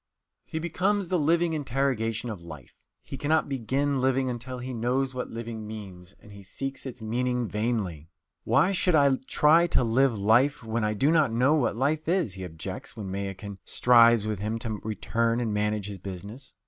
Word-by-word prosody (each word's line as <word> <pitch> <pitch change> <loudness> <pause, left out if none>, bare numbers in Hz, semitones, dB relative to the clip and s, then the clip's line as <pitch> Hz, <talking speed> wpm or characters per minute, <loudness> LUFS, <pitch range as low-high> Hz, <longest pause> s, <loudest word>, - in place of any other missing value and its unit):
He - - -6
becomes 180 +4 0
the 180 - +1
living 165 +2 +2
interrogation 125 -5 -1
of 100 -5 -7
life. 75 -6 -11 0.3
He 135 - -8
cannot 155 +4 +1
begin 135 +1 -1
living 130 0 +1
until 125 +1 -6
he 125 +1 -6
knows 125 +3 0
what 125 0 -4
living 115 -2 -6
means, 95 -4 -9
and 105 - -16
he 100 0 -11
seeks 135 +8 -5
its 125 -3 -8
meaning 125 +2 -1
vainly. 105 -9 -2 0.3
"Why 155 +8 +3
should 180 -2 +2
I 140 -3 +5
try 165 +3 +4
to 145 - +2
live 120 +1 +2
life 120 +7 +3
when 115 0 -2
I 105 0 0
do 140 +9 +2
not 155 -7 +3
know 125 +6 +3
what 145 -9 +1
life 150 +6 0
is?" 170 - +1
he 95 0 -7
objects 80 +4 -7
when 100 -3 -5
Mayakin 100 0 -5
strives 115 -3 +5
with 105 -3 -2
him 110 +3 -2
to 110 -3 -4
return 115 +2 -1
and 115 -3 -1
manage 105 -1 -1
his 100 -2 -7
business. 100 +8 -9
120 Hz, 185 wpm, -27 LUFS, 105-135 Hz, 0.3 s, I